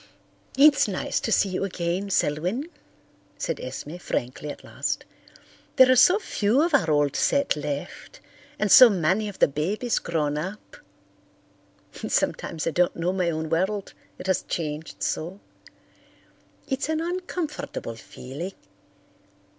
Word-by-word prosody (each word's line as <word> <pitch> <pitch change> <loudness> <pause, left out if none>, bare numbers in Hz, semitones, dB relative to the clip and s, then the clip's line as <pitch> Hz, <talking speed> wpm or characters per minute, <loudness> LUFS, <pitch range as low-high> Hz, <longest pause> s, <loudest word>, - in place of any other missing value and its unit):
"It's 285 -2 +6
nice 190 -3 -2
to 225 - -3
see 200 -1 +3
you 185 +1 -2
again, 185 +1 -2
Selwyn," 180 - 0 0.7
said - - -3
Esme 160 +4 -6
frankly 140 -3 -4
at - - -8
last. - - -3 0.7
"There 260 0 +7
are - - +6
so 360 - +6
few 250 - +1
of 340 -1 0
our 260 - +3
old 145 -2 +2
set 280 0 +2
left, 145 -1 -6 0.4
and 210 -8 0
so 255 -2 +10
many 190 +2 +1
of 200 - -10
the - - +5
babies 190 - -1
grown 150 -3 -1
up. 205 - -7 1.3
Sometimes 165 - -1
I 165 - 0
don't 175 +2 +2
know 175 +2 -1
my 180 -2 0
own 160 -1 -2
world, 190 +4 -1 0.2
it - - -9
has 190 -1 +1
changed 150 - -5
so. 170 - -3 1.3
It's 270 +3 -2
an 315 0 0
uncomfortable 330 - -4
feeling. 140 - -8
185 Hz, 135 wpm, -25 LUFS, 155-255 Hz, 1.3 s, so